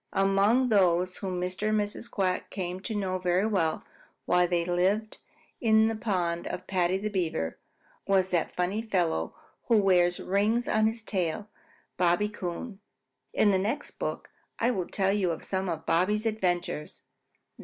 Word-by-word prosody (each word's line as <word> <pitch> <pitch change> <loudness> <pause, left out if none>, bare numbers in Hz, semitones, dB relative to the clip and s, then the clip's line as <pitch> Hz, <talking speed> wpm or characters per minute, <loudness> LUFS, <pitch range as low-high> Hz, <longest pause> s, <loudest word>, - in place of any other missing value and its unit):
Among 200 +6 +3
those 185 -3 +3
whom 185 -2 -3
Mr. 185 +4 -2
and 215 0 +2
Mrs. 210 +3 -4
Quack 185 -4 -1
came 180 -2 -4
to 215 +3 -5
know 185 -2 -1
very 180 +2 +1
well 185 -7 0 0.4
while 180 0 +3
they 170 -1 0
lived 190 +5 0 0.4
in 220 -2 +4
the 225 - -2
pond 180 -6 -1
of 185 - -5
Paddy 185 -1 +1
the 210 +2 -3
Beaver 160 - -2 0.5
was 190 -1 +2
that 175 -3 0
funny 185 +5 0
fellow 180 -7 -1 0.3
who 230 -3 +5
wears 180 -3 +3
rings 210 +5 +1
on 215 0 +3
his 225 +1 -3
tail 195 +1 -2 0.5
Bobby 180 +4 +2
Coon. 195 +2 -6 0.5
In 205 - +3
the 190 - +2
next 220 +9 -3
book - - -4 0.3
I 235 +2 +2
will 185 -7 -2
tell 195 -1 +1
you 200 -3 +1
of 165 - -4
some 190 -1 -2
of 160 -1 -4
Bobby's 210 +6 +1
adventures. 180 -8 -2
190 Hz, 160 wpm, -28 LUFS, 180-215 Hz, 0.5 s, who